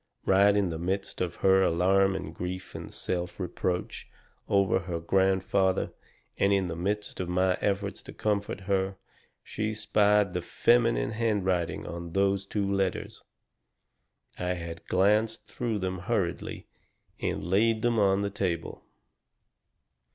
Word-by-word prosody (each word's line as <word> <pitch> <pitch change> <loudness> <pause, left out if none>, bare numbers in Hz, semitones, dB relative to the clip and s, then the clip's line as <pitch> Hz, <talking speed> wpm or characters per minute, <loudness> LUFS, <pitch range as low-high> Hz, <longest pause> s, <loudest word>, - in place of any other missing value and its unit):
Right 100 +1 +5
in 100 -3 +2
the 80 -1 -4
midst 95 +3 -3
of 90 -2 -1
her 95 0 +6
alarm 95 +2 +3
and 80 -4 -5
grief 90 +1 -5
and - - -7
self 90 0 -3
reproach 90 0 -3 0.4
over 100 -1 +3
her 85 -2 -4
grandfather, 95 +1 +1 0.5
and 100 - +3
in 100 -1 +3
the 85 -2 -4
midst 100 +5 -3
of 90 -2 -3
my 90 +1 +2
efforts 100 0 -1
to - - -11
comfort 105 -2 -2
her, 95 0 -1 0.5
she 110 0 -3
spied 105 -2 +3
the 90 - -1
feminine 120 +6 +2
handwriting 100 -6 0
on 85 0 -6
those 100 0 +1
two 100 -1 -1
letters. 95 -2 -1 1.2
I 90 0 0
had 85 -1 -7
glanced 105 +4 +2
through 115 -3 -3
them 95 -1 -3
hurriedly, 95 -3 -2 0.5
and - - -2
laid 110 +5 +2
them 120 -2 +2
on 100 0 +3
the 100 - -2
table. 85 -4 -3
95 Hz, 135 wpm, -28 LUFS, 90-100 Hz, 1.2 s, her